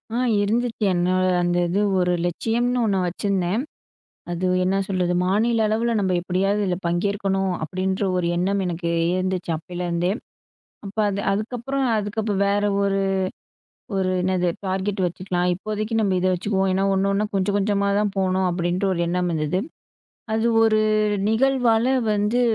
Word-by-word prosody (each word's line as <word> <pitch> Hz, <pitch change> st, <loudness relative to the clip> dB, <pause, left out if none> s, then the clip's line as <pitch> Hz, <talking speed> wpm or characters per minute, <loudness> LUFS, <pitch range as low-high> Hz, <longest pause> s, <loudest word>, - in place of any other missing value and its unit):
ஆ -, -, 0 dB, 0.3 s
இருந்துச்சு. 230 Hz, +2 st, -1 dB
என்ன, 175 Hz, 0 st, +1 dB, 0.3 s
அந்த 175 Hz, 0 st, +1 dB
இது 190 Hz, +4 st, 0 dB, 0.2 s
ஒரு 180 Hz, 0 st, +2 dB
லட்சியம்னு 235 Hz, +7 st, 0 dB
ஒண்ணு 200 Hz, -3 st, +1 dB
வச்சிருந்தேன். 190 Hz, +3 st, -1 dB, 0.7 s
அது 175 Hz, +2 st, -1 dB, 0.2 s
என்ன 190 Hz, +1 st, +1 dB
சொல்றது, 185 Hz, -2 st, 0 dB
மாநில 220 Hz, +5 st, +2 dB
அளவுல 225 Hz, +2 st, 0 dB
நம்ப 190 Hz, -2 st, 0 dB
எப்படியாவது 190 Hz, +3 st, 0 dB
இதுல 180 Hz, -2 st, 0 dB
பங்கேற்கணும் 195 Hz, +2 st, 0 dB
அப்டீன்ற 190 Hz, +4 st, -2 dB
ஒரு 180 Hz, -1 st, 0 dB
எண்ணம் 195 Hz, +3 st, 0 dB
எனக்கு 170 Hz, -1 st, -2 dB, 0.2 s
இருந்துச்சு. 185 Hz, -1 st, -2 dB
அப்பயலேருந்தே, 175 Hz, +1 st, -2 dB, 0.8 s
அப்ப 195 Hz, -, -9 dB
அது 200 Hz, 0 st, -2 dB
அதுக்கப்புறம், 245 Hz, +6 st, -2 dB
அதுக்கப்புறம் 210 Hz, -1 st, -2 dB
வேற 205 Hz, +1 st, +1 dB, 0.2 s
ஒரு, 195 Hz, 0 st, +1 dB, 1.0 s
ஒரு 190 Hz, -1 st, +1 dB
என்னது 180 Hz, -1 st, +1 dB, 0.2 s
டார்கெட் 190 Hz, +1 st, -1 dB
வச்சுக்கலாம். 180 Hz, 0 st, -2 dB
இப்போதைக்கு 215 Hz, +4 st, -4 dB
நம்ப 200 Hz, -3 st, +1 dB
இத 185 Hz, -, +1 dB
வச்சுக்குவோம். 190 Hz, +1 st, 0 dB
ஏன்னா, 190 Hz, +1 st, +1 dB
ஒண்ணு, 195 Hz, +1 st, +1 dB
ஒண்ணா, 205 Hz, +2 st, +1 dB
கொஞ்சம் 195 Hz, +1 st, +1 dB
கொஞ்சமா 200 Hz, 0 st, +1 dB
தான் 210 Hz, -1 st, 0 dB
போணும் 190 Hz, -1 st, +1 dB
அப்டீன்ற 175 Hz, +2 st, -1 dB
ஒரு 170 Hz, -, -2 dB
எண்ணம் 180 Hz, +1 st, 0 dB
இருந்தது. 155 Hz, +3 st, 0 dB, 0.7 s
அது 220 Hz, +1 st, +1 dB, 0.2 s
ஒரு 215 Hz, -1 st, +3 dB, 0.5 s
நிகழ்வால 240 Hz, -1 st, +2 dB, 0.2 s
வந்து 210 Hz, +4 st, +1 dB
195 Hz, 140 wpm, -23 LUFS, 180-210 Hz, 1.0 s, ஒரு